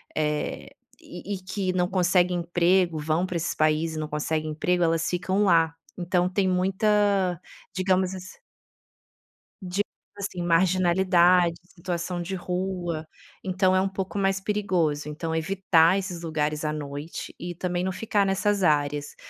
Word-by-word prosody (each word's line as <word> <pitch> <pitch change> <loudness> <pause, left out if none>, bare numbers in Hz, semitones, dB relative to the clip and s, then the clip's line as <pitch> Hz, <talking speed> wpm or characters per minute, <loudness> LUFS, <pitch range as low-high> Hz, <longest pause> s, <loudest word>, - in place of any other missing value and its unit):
eh, 150 -1 -2 0.3
e 180 +3 -7
e - - -5
que 185 0 -3
não 180 -1 +1
conseguem 180 -1 +2
emprego, 175 0 +2
vão 155 +4 0
pra 180 - -5
esses 170 +2 -2
países 155 +1 +1
e - - -3
não 155 - -3
conseguem 155 +1 -2
emprego, 175 +3 0
elas 165 0 +1
ficam 185 +3 0
lá. 165 -4 +4 0.2
Então 180 0 +1
tem 190 +1 0
muita, 195 -1 +2 0.3
digamos 185 0 +1
ass 185 0 -9 1.2
digamos 190 +2 -2 0.3
assim, 195 -3 -4
marginalidade, 180 0 +3
situação 175 -1 -4
de 190 +3 -4
rua, 180 -3 -3 0.4
então 185 0 +2
é 185 - +3
um 195 - 0
pouco 190 +1 -4
mais 195 -1 +1
perigoso. 180 -8 -1
Então 160 +2 -4
evitar 170 0 +3
esses 185 -3 -4
lugares 155 -1 -1
à 150 - 0
noite 145 +1 -6
e 175 +1 -5
também 175 0 -2
não 190 - -1
ficar 205 +1 0
nessas 200 0 +1
áreas. 145 -2 +1
180 Hz, 145 wpm, -25 LUFS, 165-190 Hz, 1.2 s, lá